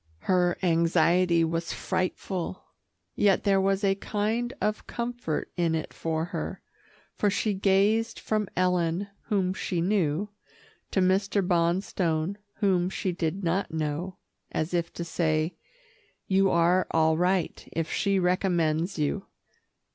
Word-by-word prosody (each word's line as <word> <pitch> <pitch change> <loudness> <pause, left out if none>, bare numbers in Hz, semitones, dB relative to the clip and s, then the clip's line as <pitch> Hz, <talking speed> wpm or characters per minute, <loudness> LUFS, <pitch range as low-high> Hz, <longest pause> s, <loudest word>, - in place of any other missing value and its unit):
Her 180 -2 +2
anxiety 170 0 +3
was 165 +1 -1
frightful, 185 0 -3 0.5
yet 200 -2 +3
there 195 -2 +3
was 195 +1 +1
a 195 -1 +4
kind 215 +4 -1
of 215 0 -1
comfort 235 -9 -3
in 170 -2 +1
it 160 - -4
for 160 0 -2
her, 175 - -5 0.5
for 205 - +1
she 205 +1 0
gazed 205 +4 +2
from 215 -2 -1
Ellen, 180 +1 +1 0.2
whom 190 -4 +1
she 185 -1 -2
knew, 180 0 +1 0.6
to 190 - +1
Mr. 195 +1 +2
Bonstone 170 0 0 0.2
whom 185 -4 +2
she 190 0 -2
did 175 +2 -2
not 180 +4 0
know, 160 +3 -3 0.3
as 160 +3 -2
if 170 -1 0
to 170 - -4
say, 160 -1 0 0.7
"You 195 0 +3
are 175 +1 +3
all 160 -1 +3
right, 180 +2 0
if 165 -1 -2
she 200 -1 +1
recommends 175 -1 +1
you." 155 +6 -1
180 Hz, 130 wpm, -27 LUFS, 165-195 Hz, 0.7 s, a